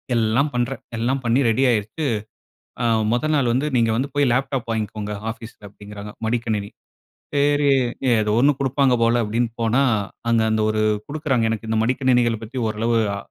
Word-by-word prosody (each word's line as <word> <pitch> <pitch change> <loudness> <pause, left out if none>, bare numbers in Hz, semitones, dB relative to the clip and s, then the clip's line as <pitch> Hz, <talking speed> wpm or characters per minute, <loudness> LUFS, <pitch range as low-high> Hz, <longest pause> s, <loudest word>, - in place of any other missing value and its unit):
எல்லாம் 115 +6 +2
பண்றேன். 120 +2 -2 0.2
எல்லாம் 130 +4 0
பண்ணி 120 +2 +2
ரெடி 120 +4 +2
ஆயிருக்கு, 115 +7 -1 0.8
அ - - 0 0.3
மொத 120 +5 0
நாள் 135 -5 +2
வந்து, 130 +4 0
"நீங்க 115 -2 +3
வந்து 130 +4 -1
போய் 145 -2 +3
லேப்டாப் 130 -1 -1
வாங்கிக்கோங்க 105 -1 -3 0.2
ஆஃபீஸ்ல." 115 -1 -12
அப்படீங்கிறாங்க 105 0 -10
மடிக்கணினி. 110 -3 -1 0.7
"சேரி, 145 0 +3 0.5
ஏதோ 105 -1 +1
1 140 +4 +4
குடுப்பாங்க 135 -1 +2
போல" 120 +1 +3
அப்படீன்னு 115 +2 -1
போனா, 115 +4 +2 0.5
அங்க 115 -1 +3
அந்த 110 0 +1
ஒரு 110 0 0 0.3
குடுக்குறாங்க 135 -6 0
எனக்கு 110 0 -4
இந்த 110 0 +1
மடிக்கணினிகள 125 -2 +2
பத்தி 125 +4 -6
ஓரளவு 115 +2 0 0.2
அ - - -5
120 Hz, 160 wpm, -22 LUFS, 110-135 Hz, 0.8 s, 1